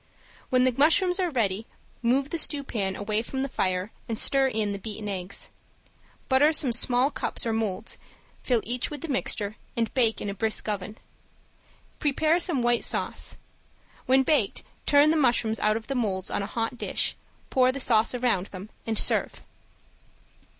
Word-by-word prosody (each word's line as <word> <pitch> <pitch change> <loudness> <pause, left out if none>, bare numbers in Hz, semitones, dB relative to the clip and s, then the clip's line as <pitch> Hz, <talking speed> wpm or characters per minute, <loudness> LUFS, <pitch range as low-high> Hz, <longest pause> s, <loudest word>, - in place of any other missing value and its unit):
When 255 0 +3
the 255 - +3
mushrooms 355 +6 +3
are 365 -2 +1
ready 220 - -1 0.3
move 265 +4 +1
the 335 - 0
stewpan 235 -12 -1
away 210 +1 -1
from 265 +3 -4
the - - -1
fire 185 -4 -2 0.2
and 225 - -2
stir 270 +3 +4
in 215 -5 -1
the 200 - -4
beaten 210 0 -6
eggs. 190 -1 -4 0.8
Butter 280 +3 +4
some 265 -5 +1
small 250 +3 +3
cups - - -1
or 225 - 0
molds, 220 -1 -3 0.4
fill 245 -3 +1
each 245 +2 -1
with 295 -3 -7
the - - -5
mixture, 215 -6 -2 0.2
and 230 -1 -1
bake 230 -4 +2
in - - -5
a 200 - -3
brisk 220 +3 -1
oven. 210 +1 -4 1.0
Prepare 310 +3 +2
some 335 -8 +1
white 240 0 +2
sauce; - - -1 0.7
when 265 +1 +5
baked 260 -8 +1 0.2
turn 290 +1 +5
the 320 - +2
mushrooms 235 -5 +2
out 215 +1 +2
of 225 - -8
the 275 - -3
molds 200 -7 -2
on - - -1
a 200 - -4
hot 230 +2 -3
dish, - - 0 0.4
pour 255 -1 +4
the 275 - -6
sauce 230 -2 +3
around 235 -7 0
them, 195 +2 -10 0.2
and 220 -1 0
serve. - - +3
235 Hz, 170 wpm, -26 LUFS, 210-270 Hz, 1.0 s, when